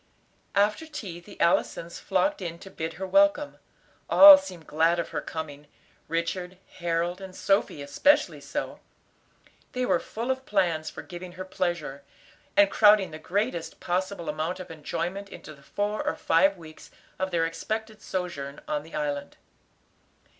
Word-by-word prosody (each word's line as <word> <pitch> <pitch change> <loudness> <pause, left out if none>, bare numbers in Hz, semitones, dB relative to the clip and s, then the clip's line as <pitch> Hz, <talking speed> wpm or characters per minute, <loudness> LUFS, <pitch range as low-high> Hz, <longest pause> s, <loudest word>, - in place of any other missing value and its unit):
After 210 +10 +2
tea 200 - -7
the 170 - -15
Allisons 170 0 +1
flocked 195 +7 0
in 170 -2 -5
to 190 +3 -12
bid 160 0 -4
her 190 +4 -5
welcome. 295 +6 +3 0.5
All 295 0 +11
seemed 185 - -6
glad 165 +3 +2
of 170 - -2
her - - -3
coming, 150 -2 -7 0.4
Richard, 180 +2 -2 0.2
Harold, 175 +2 -1
and 190 -1 -9
Sophy 195 -7 +1
especially 285 - +2
so. - - -4 0.9
They 250 0 0
were - - +2
full 235 +4 -3
of 260 0 -4
plans 170 -6 +1
for - - -9
giving 175 0 -9
her 185 +1 -7
pleasure, 175 -7 -3 0.6
and 200 -1 +6
crowding 205 -4 +5
the 155 - -8
greatest 185 0 -2
possible 185 0 -2
amount 155 +4 -2
of 185 - -8
enjoyment 170 +5 -4
into 155 - -10
the 140 - -18
four 205 +9 -2
or - - -1
five 195 +4 +3
weeks 160 -2 -13 0.3
of 190 0 0
their 170 -2 +1
expected 220 +6 -4
sojourn 170 -9 -4
on 150 -1 -1
the 160 +2 -11
island. 145 -1 -3
180 Hz, 155 wpm, -27 LUFS, 165-200 Hz, 0.9 s, All